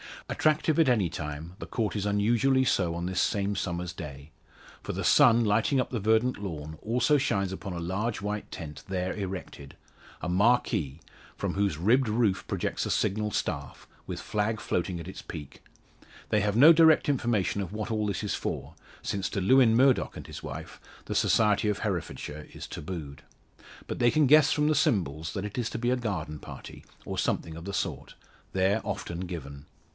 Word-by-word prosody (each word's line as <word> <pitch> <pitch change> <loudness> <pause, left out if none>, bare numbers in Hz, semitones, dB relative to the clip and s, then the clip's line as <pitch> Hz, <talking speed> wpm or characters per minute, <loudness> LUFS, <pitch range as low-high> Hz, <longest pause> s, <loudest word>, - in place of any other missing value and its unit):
Attractive 155 0 +2
at 160 -5 +5
any 105 -8 +2
time, 75 +3 -6
the - - -7
Court 110 -3 -2
is 105 -1 -1
unusually 115 +6 +3
so 90 -9 +1
on 85 +1 -3
this 90 -1 0
same 100 0 0
summer's 85 -2 -3
day. 70 -2 -9 0.5
For - - -5
the - - -3
sun, 120 -5 +6
lighting 110 +6 +2
up 125 - -1
the 120 - -1
verdant 110 +3 +2
lawn, 80 -5 -6
also 125 +6 +2
shines 100 -7 0
upon 95 0 -5
a 85 - -4
large 100 +7 -2
white 105 +1 -4
tent 80 -5 -8
there 95 -1 -2
erected 95 -8 -6 0.5
a 90 - -3
marquee 95 - +2 0.3
from - - -2
whose 100 -6 0
ribbed 115 - +3
roof 105 -4 +1
projects - - -2
a - - -4
signal 105 +2 0
staff, 70 -8 -4 0.2
with - - -5
flag 105 +1 -1
floating 90 0 -2
at 85 - -8
its - - -8
peak. 75 -3 -9 0.7
They 105 - +3
have 105 0 0
had 120 - +4
no 160 +3 +10
direct 160 -1 +5
information 120 -8 +1
of 95 0 -5
what 110 +1 -4
all 105 -1 0
this 100 -2 -2
is 105 - -1
for - - -4 0.3
since 100 -2 -2
to 100 - -2
Lewin 115 +3 +5
Murdock 130 +1 +3
and - - -8
his - - -8
wife - - -8 0.3
the - - -4
society 105 -1 +3
of 105 -1 0
Herefordshire 85 -6 -4
is - - -7
tabooed. 75 -4 -7 0.6
But - - -5
they 120 - +5
can 155 +3 +3
guess 150 +2 +6
from 150 -1 +2
the 155 - +3
symbols 80 - 0
that 100 0 -3
it 105 +4 -4
is 120 -1 -1
to - - -3
be 120 +1 0
a 130 - +2
garden 90 -10 -3
party, - - -10 0.2
or - - -3
something 80 -1 -1
of 85 +1 -9
the 100 - -5
sort, - - -3 0.4
there 95 +3 +2
often 85 - -4
given. 70 -5 -7
100 Hz, 190 wpm, -28 LUFS, 85-115 Hz, 0.7 s, no